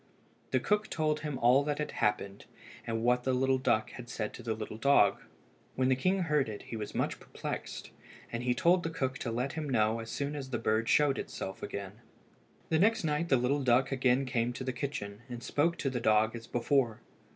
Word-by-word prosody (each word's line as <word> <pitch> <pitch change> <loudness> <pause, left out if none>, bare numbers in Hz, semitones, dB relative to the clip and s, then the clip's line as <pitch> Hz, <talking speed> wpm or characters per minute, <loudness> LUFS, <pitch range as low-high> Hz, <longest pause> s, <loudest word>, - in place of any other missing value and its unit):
The - - +2
cook 210 +1 +1
told 155 -1 0
him 150 -3 -4
all 125 +3 +5
that 145 0 -1
had 150 - -3
happened, 100 -1 -1 0.4
and 115 0 -1
what 125 +1 +3
the 130 +1 +2
duck 110 -4 +1
had 120 -2 -9
said 105 -1 -3
to - - -9
the 115 -2 -2
little 110 0 -6
dog. 115 -7 +4 0.5
When 130 0 +2
the 130 - +4
king 185 +8 +1
heard 150 -6 +1
it 105 - -7
he - - -7
was 105 -2 -5
much - - -1
perplexed, - - -6 0.4
and 115 - -3
he 125 0 +1
told 175 +6 +4
the 165 - -2
cook 130 -5 -2
to 120 - -3
let 125 +4 -2
him 155 -2 -4
know 110 -2 +2
as 115 0 -7
soon 140 +4 -3
as 135 -3 -5
the 120 - -1
bird 110 0 0
showed 145 -3 +4
itself 95 0 -6
again. 100 +3 -6 0.7
The 160 - +2
next 220 +3 +3
night 155 +2 0
the 135 - +5
little 130 +4 +1
duck 130 +2 +3
again 130 0 +2
came 125 -1 0
to 130 - -5
the 130 0 -2
kitchen, 115 -6 -5
and 120 -1 -7
spoke 165 +4 +1
to 135 - -1
the 125 -2 -2
dog 110 0 +3
as 115 -1 -8
before. 120 -2 +1
125 Hz, 215 wpm, -31 LUFS, 115-145 Hz, 0.7 s, all